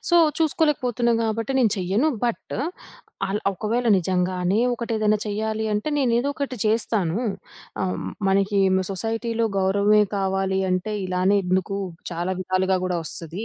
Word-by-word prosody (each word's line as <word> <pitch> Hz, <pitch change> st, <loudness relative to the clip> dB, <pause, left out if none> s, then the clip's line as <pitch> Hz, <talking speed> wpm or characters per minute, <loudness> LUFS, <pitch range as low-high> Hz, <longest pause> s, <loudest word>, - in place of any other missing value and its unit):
So, 345 Hz, -, +4 dB, 0.2 s
చూసుకోలేకపోతున్నా 265 Hz, -7 st, +1 dB
గాబట్టి 225 Hz, +2 st, -1 dB
నేను 235 Hz, -5 st, +4 dB
చెయ్యను. 195 Hz, -, +1 dB, 0.2 s
బట్ 235 Hz, -, -2 dB, 0.7 s
అల్ 205 Hz, +2 st, -1 dB
ఒకవేళ 225 Hz, +5 st, -1 dB
నిజంగానే 180 Hz, +2 st, 0 dB, 0.2 s
ఒకటేదైనా 215 Hz, -3 st, 0 dB
చెయ్యాలి 220 Hz, +1 st, -2 dB
అంటే, 210 Hz, +8 st, -1 dB
నేను 250 Hz, -4 st, +2 dB
ఏదో 260 Hz, +4 st, 0 dB
ఒకటి 275 Hz, -3 st, -3 dB
చేస్తాను. 215 Hz, -5 st, +1 dB, 0.6 s
ఆహ్, 185 Hz, -, -1 dB, 0.3 s
మనకి 195 Hz, +1 st, +2 dB, 0.3 s
సొసైటీ‌లో 225 Hz, +3 st, -1 dB
గౌరవమే 200 Hz, +2 st, +4 dB
కావాలి 190 Hz, 0 st, 0 dB
అంటే 185 Hz, +4 st, -1 dB
ఇలానే 185 Hz, +2 st, +2 dB
ఎందుకు 190 Hz, +2 st, 0 dB, 0.3 s
చాలా 175 Hz, +3 st, -2 dB
విధాలుగా 185 Hz, +1 st, +1 dB
గూడా 180 Hz, -2 st, -1 dB
వస్తది. 170 Hz, +6 st, -6 dB
205 Hz, 125 wpm, -23 LUFS, 185-230 Hz, 0.7 s, So